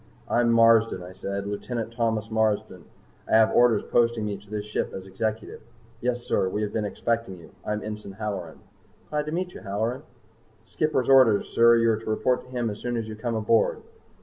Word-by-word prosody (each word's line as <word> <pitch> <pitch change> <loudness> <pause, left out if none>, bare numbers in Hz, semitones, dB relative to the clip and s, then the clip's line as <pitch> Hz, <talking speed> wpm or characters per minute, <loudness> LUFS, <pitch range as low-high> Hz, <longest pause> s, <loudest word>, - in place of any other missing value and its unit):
"I'm 120 -1 +2
Marsden," 115 -4 +4
I 90 +1 -10
said. 100 +1 -4
"Lieutenant 115 +3 -4
Thomas 110 -2 -1
Marsden. 110 -4 0 0.4
I - - -3
have 110 0 +5
orders 120 -3 +4
posting 115 -2 +1
me 105 -1 -2
to 100 +1 -15
this 105 -1 -4
ship 105 - -3
as 95 - -7
Executive." 110 +3 -4 0.4
"Yes, 120 0 -1
sir. 95 - 0
We 105 +3 -2
have 105 - -3
been 110 -2 -1
expecting 115 -2 -2
you. 85 -2 -15
I'm 105 0 -3
Ensign 105 -2 -7
Halloran." 95 -6 -5 0.5
"Glad 150 0 -1
to - - -3
meet 180 +2 -3
you, - - -9
Halloran." 110 +6 -2 0.6
"Skipper's 155 -5 -1
orders, 130 -6 +5
sir. 115 0 +5
You 115 0 +3
are 110 - 0
to 110 - -7
report 125 +3 +1
to - - -17
him 120 -3 -2
as 105 - -8
soon 120 -1 -3
as 115 -1 -3
you 110 - -6
come 115 +1 -3
aboard." 110 +1 +1
110 Hz, 200 wpm, -25 LUFS, 105-120 Hz, 0.6 s, have